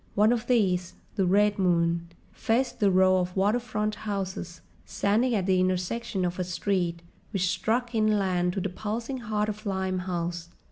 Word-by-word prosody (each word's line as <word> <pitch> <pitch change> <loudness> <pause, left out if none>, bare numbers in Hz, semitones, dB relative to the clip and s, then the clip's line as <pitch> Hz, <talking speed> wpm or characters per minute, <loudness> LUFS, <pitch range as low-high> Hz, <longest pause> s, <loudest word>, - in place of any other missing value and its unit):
One 210 +2 +5
of 235 0 -3
these, 185 -8 +1 0.2
the 190 -2 +1
Red 205 +2 +3
Moon, 170 -2 +2 0.2
faced 245 +4 0
the 205 - +4
row 185 0 +4
of 180 0 -3
waterfront 215 +1 0
houses, 190 -5 -5 0.2
standing 225 +5 +1
at 195 -3 0
the 185 -1 +3
intersection 185 +2 -1
of 175 +1 -3
a - - +1
street 180 -2 -1 0.3
which 185 -3 0
struck 235 +6 -1
inland 195 -5 +1
to 195 - -2
the 195 - -2
pulsing 230 +7 -4
heart 215 -3 -1
of 215 0 -5
Limehouse. 180 -3 -2
195 Hz, 155 wpm, -27 LUFS, 180-215 Hz, 0.3 s, One